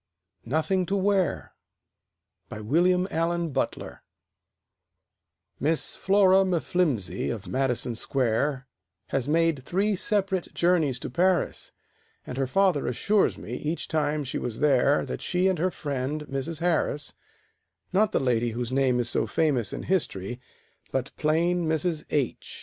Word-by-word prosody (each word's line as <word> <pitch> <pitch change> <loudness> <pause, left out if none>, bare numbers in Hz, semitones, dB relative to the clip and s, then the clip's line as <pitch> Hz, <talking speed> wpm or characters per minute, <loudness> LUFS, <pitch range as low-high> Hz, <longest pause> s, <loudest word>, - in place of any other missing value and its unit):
NOTHING 170 - 0
TO 195 - 0
WEAR 195 -1 +1 1.0
BY 110 - -7
WILLIAM 180 - +2
ALLEN 170 +1 0
BUTLER - - -3 1.6
Miss 155 +4 0
Flora 195 -1 +4
M'Flimsey, 160 - 0
of 105 -4 -5
Madison 125 -2 0
Square, 130 +3 0 0.4
Has 135 -1 -1
made 165 -3 +2
three 200 +7 0
separate 190 -2 -1
journeys 165 -7 +2
to 125 - -7
Paris, 180 +5 +1 0.5
And 125 - -5
her 135 - +1
father 185 0 +2
assures 200 - +1
me, - - -8
each 155 +3 -3
time 150 -1 0
she 135 - -3
was 115 -3 -4
there, 140 -1 +3
That - - -5
she 180 +1 +1
and 185 -4 +1
her 185 +3 +2
friend, 145 -2 -3
Mrs. 145 +4 -4
Harris 160 -4 0 0.8
(Not 210 +2 +3
the - - +2
lady 120 -3 +1
whose 120 +1 -3
name 130 -2 +2
is 120 - 0
so - - 0
famous 135 -10 +1
in - - -5
history, 125 - -1 0.5
But 135 0 -2
plain 170 +2 +1
Mrs. 160 0 -1
H. 140 -4 -2
155 Hz, 135 wpm, -26 LUFS, 130-180 Hz, 1.6 s, Flora